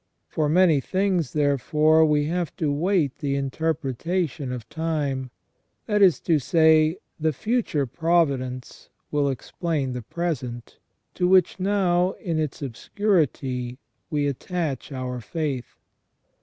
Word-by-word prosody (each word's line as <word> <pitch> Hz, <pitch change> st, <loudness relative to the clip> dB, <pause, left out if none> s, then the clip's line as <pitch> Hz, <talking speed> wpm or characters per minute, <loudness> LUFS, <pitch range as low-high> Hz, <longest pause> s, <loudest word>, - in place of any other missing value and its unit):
For 150 Hz, -2 st, -1 dB
many 170 Hz, -2 st, +5 dB
things, 185 Hz, -3 st, 0 dB
therefore, 150 Hz, +2 st, +3 dB
we 150 Hz, -1 st, +2 dB
have 170 Hz, 0 st, -2 dB
to 155 Hz, -3 st, 0 dB
wait 160 Hz, -2 st, +1 dB
the 140 Hz, -2 st, -1 dB
interpretation 150 Hz, +1 st, -2 dB
of 120 Hz, -3 st, -6 dB
time 145 Hz, -4 st, -2 dB, 0.3 s
— -, -, -48 dB
that 210 Hz, -2 st, +1 dB
is 185 Hz, -5 st, +6 dB
to 160 Hz, -3 st, +2 dB
say, 160 Hz, +2 st, +4 dB, 0.2 s
the 160 Hz, 0 st, +2 dB
future 205 Hz, -, 0 dB
providence 135 Hz, -5 st, -1 dB, 0.2 s
will 145 Hz, -1 st, +1 dB
explain 140 Hz, 0 st, -2 dB
the 125 Hz, -, -4 dB
present, 125 Hz, -4 st, -4 dB, 0.3 s
to 180 Hz, -, +1 dB
which 185 Hz, 0 st, +4 dB
now 185 Hz, -2 st, +2 dB
in 165 Hz, -3 st, -3 dB
its 155 Hz, -2 st, -3 dB
obscurity 135 Hz, -, -1 dB, 0.3 s
we 150 Hz, -3 st, 0 dB
attach 145 Hz, 0 st, -3 dB
our 130 Hz, -2 st, -4 dB
faith. 135 Hz, +1 st, -4 dB
155 Hz, 125 wpm, -24 LUFS, 135-175 Hz, 0.3 s, is